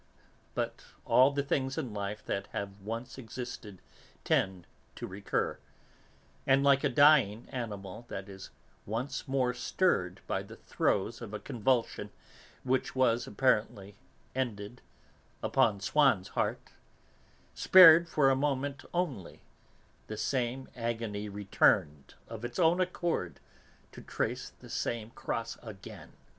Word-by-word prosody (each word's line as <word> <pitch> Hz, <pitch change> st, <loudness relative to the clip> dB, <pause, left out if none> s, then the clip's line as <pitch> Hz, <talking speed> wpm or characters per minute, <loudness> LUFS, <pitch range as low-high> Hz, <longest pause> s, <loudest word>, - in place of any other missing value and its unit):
But -, -, -3 dB, 0.2 s
all 130 Hz, +2 st, +6 dB
the 140 Hz, 0 st, -1 dB
things 135 Hz, -1 st, -1 dB
in 120 Hz, -5 st, -3 dB
life 100 Hz, +1 st, -5 dB
that 100 Hz, 0 st, -3 dB
have 100 Hz, 0 st, -5 dB
once 115 Hz, +5 st, -6 dB
existed 115 Hz, -4 st, -8 dB, 0.4 s
tend 95 Hz, -2 st, 0 dB, 0.3 s
to -, -, -6 dB
recur, 100 Hz, +2 st, -2 dB, 0.9 s
and, 135 Hz, +1 st, +4 dB
like 140 Hz, 0 st, +4 dB
a 145 Hz, -, +3 dB
dying 130 Hz, -6 st, +5 dB
animal 105 Hz, -3 st, -6 dB
that 95 Hz, -3 st, -6 dB
is 95 Hz, -1 st, -10 dB, 0.4 s
once 125 Hz, +7 st, -3 dB
more 130 Hz, -2 st, +1 dB
stirred 110 Hz, -, 0 dB
by -, -, -1 dB
the -, -, -11 dB
throes 110 Hz, +4 st, -1 dB
of 110 Hz, -3 st, -6 dB
a -, -, -4 dB
convulsion 120 Hz, -4 st, -1 dB, 0.5 s
which 130 Hz, +1 st, 0 dB
was, 120 Hz, -2 st, +2 dB
apparently, 105 Hz, -4 st, 0 dB, 0.4 s
ended, 120 Hz, -3 st, -4 dB, 0.6 s
upon 105 Hz, -3 st, +2 dB
Swann's 120 Hz, -4 st, +2 dB
heart, -, -, -2 dB, 0.8 s
spared 170 Hz, -2 st, +8 dB
for 140 Hz, -4 st, +4 dB
a -, -, +3 dB
moment 140 Hz, 0 st, -1 dB
only, 145 Hz, -, -3 dB, 0.6 s
the 110 Hz, -, -6 dB
same 130 Hz, +2 st, -1 dB
agony 115 Hz, -3 st, -3 dB
returned 95 Hz, -7 st, +1 dB
of 115 Hz, 0 st, -8 dB
its 120 Hz, 0 st, -5 dB
own 175 Hz, +1 st, +4 dB
accord 175 Hz, -, -2 dB, 0.5 s
to -, -, -11 dB
trace -, -, -3 dB
the -, -, -16 dB
same 115 Hz, -1 st, -3 dB
cross 115 Hz, 0 st, -4 dB
again. 110 Hz, -5 st, -11 dB
120 Hz, 125 wpm, -31 LUFS, 105-135 Hz, 0.9 s, spared